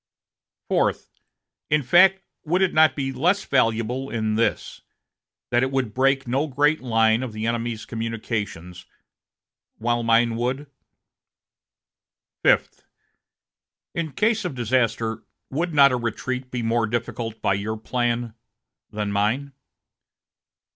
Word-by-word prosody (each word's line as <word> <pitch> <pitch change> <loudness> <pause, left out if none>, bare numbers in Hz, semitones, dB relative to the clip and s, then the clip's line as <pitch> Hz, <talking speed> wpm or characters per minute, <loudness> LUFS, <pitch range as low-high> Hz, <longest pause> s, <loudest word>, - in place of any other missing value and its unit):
"Fourth. - - 0 0.6
In 150 -1 +2
fact, 190 +8 +5 0.2
would 180 +4 +1
it 185 - +1
not 155 0 +5
be 135 -2 -2
less 180 +10 +1
valuable 125 +1 0
in 110 -2 -1
this, 115 +2 -1 0.7
that 120 0 +3
it 130 - +1
would 130 -5 -1
break 135 0 +2
no 135 +5 0
great 145 +3 +2
line 115 -2 +2
of 125 -4 -5
the 110 +1 -4
enemy's 115 -1 -2
communications, 105 -6 -5 0.9
while 120 +1 0
mine 115 0 +3
would?" 130 +4 -2 1.8
"Fifth. - - +2 1.1
In 165 -2 -3
case 215 +1 +1
of 175 -7 -4
disaster, 115 -2 0 0.3
would 165 +6 -1
not 140 -3 +6
a 125 - +1
retreat 125 +2 -4
be 125 -2 -3
more 115 0 +1
difficult 115 0 -4
by - - +1
your 105 +3 -3
plan 120 0 -2 0.6
than 105 -1 -3
mine?" 115 +8 0
120 Hz, 120 wpm, -23 LUFS, 115-140 Hz, 1.8 s, not